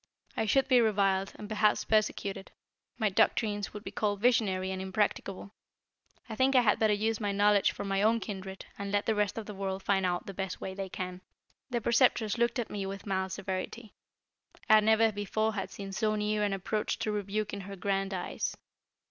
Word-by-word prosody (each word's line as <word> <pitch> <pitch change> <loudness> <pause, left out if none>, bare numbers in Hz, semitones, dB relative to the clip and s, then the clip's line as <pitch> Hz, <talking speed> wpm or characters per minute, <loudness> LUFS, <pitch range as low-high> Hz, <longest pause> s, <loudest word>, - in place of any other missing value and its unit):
I 220 - 0
should 270 +5 +3
be 255 -2 +5
reviled, 195 -3 +2
and 210 - -8
perhaps 210 0 +2
persecuted. 205 -2 0 0.5
My 220 -3 +2
doctrines 205 +1 +1
would 210 0 -8
be 195 - -6
called 205 -2 -1
visionary 195 -5 +2
and 190 0 -3
impracticable. 195 0 -2 0.8
I 220 - -6
think 265 +4 +3
I 250 - +7
had 215 -4 +3
better 220 -1 +3
use 220 +1 0
my 205 -2 -1
knowledge 205 0 +4
for - - -6
my 195 0 0
own 225 +2 +3
kindred, 190 -3 -7
and 200 0 -4
let 205 0 +1
the 220 - +2
rest 210 -1 0
of 225 - -4
the 210 - -7
world 190 -1 -4
find 195 -1 +2
out 180 -1 0
the 195 - -7
best 190 -1 -4
way 190 - -5
it 190 -1 -6
can." 185 0 -5 0.5
The 240 -2 -1
Preceptress 235 -2 +3
looked 235 +1 +2
at 240 - -3
me 200 -2 -3
with 195 0 -6
mild 190 -2 -1
severity. 195 +4 -5 0.7
I 215 -1 +8
never 220 +1 +4
before 215 +2 -1
had 195 -2 -3
seen 195 -1 -7
so 215 +2 0
near 210 0 0
an 205 -1 +1
approach 205 +3 -2
to 215 - -2
rebuke 210 +1 -2
in 200 - -4
her 195 +1 -8
grand 195 +1 -1
eyes. 185 -2 -3
205 Hz, 200 wpm, -30 LUFS, 195-215 Hz, 0.8 s, I